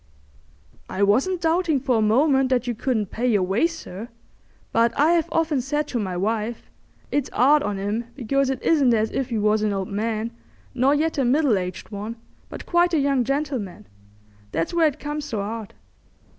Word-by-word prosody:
"I 190 +2 -1
wasn't 270 - +2
doubting 325 -2 +2
for 255 -3 +1
a - - +2
moment 265 +5 +3
that 250 -2 +1
you 245 - -1
couldn't 220 -3 -1
pay 245 +3 -1
your 210 -6 +3
way, 195 - +2
sir; 235 - -8 0.6
but 230 +2 +2
I 320 +4 +5
'ave 330 -2 +1
often 315 -5 +1
said 295 +3 -2
to 245 - -2
my 185 -4 -3
wife, 220 +4 -2 0.4
'It's 290 -2 0
'ard 290 +4 +4
on 205 -4 -2
'im 205 +4 -2
because 275 +1 0
it 265 - -3
isn't 275 -7 +4
as 220 0 0
if 270 -1 -2
he 230 - -1
was 210 0 +2
an 210 -1 0
old 195 -1 -3
man, 220 +2 -2 0.4
nor 265 +3 +3
yet 315 0 0
a - - +3
middle 265 -1 +3
aged 180 -1 -4
one, 210 +3 -5 0.3
but - - -8
quite 345 0 +2
a - - +3
young 275 -2 +2
gentleman. 265 - -3 0.7
That's 165 - -2
where 335 -2 +4
it 290 - -3
comes 295 0 -4
so 220 - -3
'ard. 215 +1 -5
245 Hz, 190 wpm, -23 LUFS, 215-290 Hz, 0.7 s, I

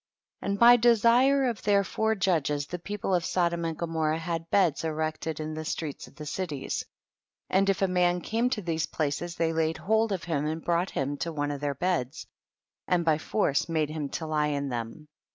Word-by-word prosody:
3. - - -6
And 200 - 0
by 240 +1 +8
desire 240 +4 +4
of 235 -5 -2
their 200 -1 +3
four 220 +4 0
judges 155 -7 0
the 180 +5 -6
people 200 +1 -3
of 175 -2 +2
Sodom 170 -1 0
and 165 -1 -3
Gomorrah 160 -2 -1
had 165 0 -4
beds 175 -7 +2
erected 155 0 -2
in 155 0 -4
the 155 0 -5
streets 155 -2 -4
of - - -18
the 150 - -8
cities, 150 -3 -3 0.7
and 195 +1 +3
if 195 0 +1
a - - +4
man 180 -1 +2
came 230 +6 0
to 220 -5 -2
these 160 -1 -1
places 160 +3 -2
they 165 0 0
laid 160 0 0
hold 220 +2 +1
of 190 -3 -2
him 150 -3 -1
and 160 +1 -4
brought 175 +2 +1
him 140 +1 -2
to 165 +4 -3
one 145 -2 -2
of 145 -1 -5
their 145 -1 -1
beds, 160 -4 -1 0.6
and 175 -2 +1
by 160 -2 +3
force 155 -3 0
made 155 -2 0
him 155 -3 -4
to 160 - -4
lie 155 -1 +1
in 140 -1 -2
them. 120 +5 -5
165 Hz, 205 wpm, -28 LUFS, 155-190 Hz, 0.7 s, by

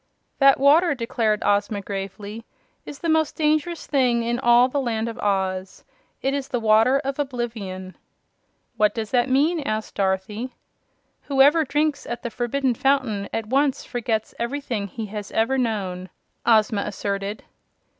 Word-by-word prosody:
"That 275 -1 +6
water," 295 +4 +5
declared 230 -3 0
Ozma, 205 0 +1
gravely, 200 +2 -6 0.4
"is 290 - -7
the 335 - -4
most 315 -1 +2
dangerous 310 +2 0
thing 250 -4 +2
in 240 +1 -1
all 240 0 +5
the 280 +2 -1
Land 230 -3 -1
of 230 0 -6
Oz. 190 -2 -2 0.4
It 270 - +1
is 280 -1 -2
the 245 - -2
Water 225 +4 +4
of 275 +1 -3
Oblivion." 225 -9 -4 0.8
"What 210 -1 +3
does 220 -2 -4
that 245 0 +2
mean?" 300 +6 +2
asked 215 -6 -3
Dorothy. 200 +5 -2 0.7
"Whoever 285 +4 +5
drinks 295 +1 -1
at 240 0 -5
the 235 - -4
Forbidden 250 +2 0
Fountain 240 -6 0
at 225 - -2
once 270 +4 +1
forgets 230 -3 -2
everything 235 -4 -3
he 220 +3 -6
has 210 0 -7
ever 260 +4 +1
known," 190 -6 -2 0.4
Ozma 215 -2 +4
asserted. 200 0 -4
235 Hz, 145 wpm, -23 LUFS, 210-275 Hz, 0.8 s, That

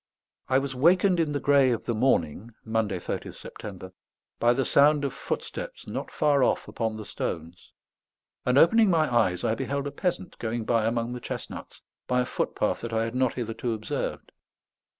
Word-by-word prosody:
I 130 - +4
was 135 0 -1
wakened 175 +7 +4
in 160 -3 +1
the 145 - -1
grey 140 -2 +4
of 120 -3 -1
the 120 - 0
morning 110 - 0
(Monday, 110 -4 0
30th 85 - -5
September) 95 -2 -9 0.5
by 120 - +4
the 130 +1 +1
sound 145 +2 +4
of 140 - -2
footsteps - - -5
not - - -5
far 145 -3 +2
off - - +1
upon 110 -2 -3
the 110 - -7
stones, 85 0 -5 0.7
and, 125 +1 +2
opening 215 +7 +6
my 155 -7 +2
eyes, 90 -7 +2
I 110 - +2
beheld 140 +3 -2
a 145 - -3
peasant 180 +1 -3
going 115 0 -3
by 115 -2 +2
among 115 +1 -1
the 125 - -5
chestnuts - - -7 0.2
by 125 0 +2
a - - -1
footpath - - -1
that 115 -1 -5
I 110 0 +1
had 115 0 -3
not 130 -1 +1
hitherto 120 0 -3
observed. 110 0 -4
125 Hz, 180 wpm, -27 LUFS, 110-140 Hz, 0.7 s, opening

